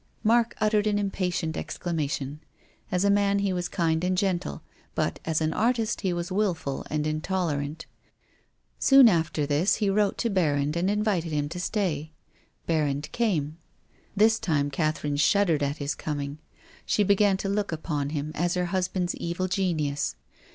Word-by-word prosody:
Mark 235 +1 +3
uttered 215 0 +2
an 205 -1 +2
impatient 180 -5 -1
exclamation. 150 -4 -3 0.5
As 180 +2 +1
a - - +4
man 200 0 +3
he 200 -1 0
was 180 -1 -2
kind 165 -1 0
and 185 0 +1
gentle, 180 - -1 0.3
but - - -1
as 160 0 0
an 155 0 0
artist 230 +1 0
he 190 -3 0
was 175 +1 -3
wilful 180 -9 -1
and 150 0 -1
intolerant. 155 -2 -2 0.9
Soon 270 -2 +7
after 160 -6 +1
this 150 +7 +2
he 205 -2 +1
wrote 205 0 +1
to 230 - 0
Berrand 150 -5 +1
and 175 +3 +1
invited 205 -6 0
him 145 -1 0
to 175 +3 -6
stay. 165 -6 -2 0.5
Ber 160 -2 +1
rand 145 +1 -3
came. 165 -9 -1 0.6
This 220 +2 +5
time 145 -4 0
Catherine 150 0 -1
shuddered 165 0 +3
at 140 +1 -1
his 145 +1 -2
coming. 145 -1 -4 0.4
She 210 - +2
began 200 0 +3
to 195 - -4
look 200 0 -1
upon 150 -3 -2
him 150 0 -3
as 175 +3 0
her 180 0 0
husband's 185 -1 0
evil 170 +2 -2
genius. 160 -7 -1
175 Hz, 160 wpm, -26 LUFS, 150-200 Hz, 0.9 s, Soon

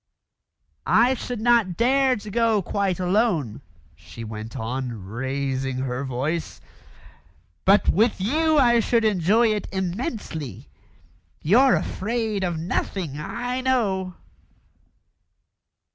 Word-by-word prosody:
"I 240 +4 +4
should 245 -2 -5
not 230 -7 +3
dare 260 +2 +3
to 210 -1 -8
go 225 -2 +2
quite 195 -1 -1
alone," 180 - 0 0.3
she 85 +9 -11
went 110 +3 -7
on, 120 -3 -4
raising 130 +3 -3
her 130 0 -3
voice; 140 +6 -3 1.1
"but 200 +2 +4
with 215 +4 +2
you 310 +10 +2
I 240 -4 +5
should 230 0 +1
enjoy 215 +3 +3
it 210 - -4
immensely. 190 - -4 0.8
You're 245 - +5
afraid 220 -1 -2
of 175 -3 -1
nothing, 165 -2 -3
I 245 +10 -3
know." 195 -8 0
190 Hz, 105 wpm, -23 LUFS, -, 1.1 s, I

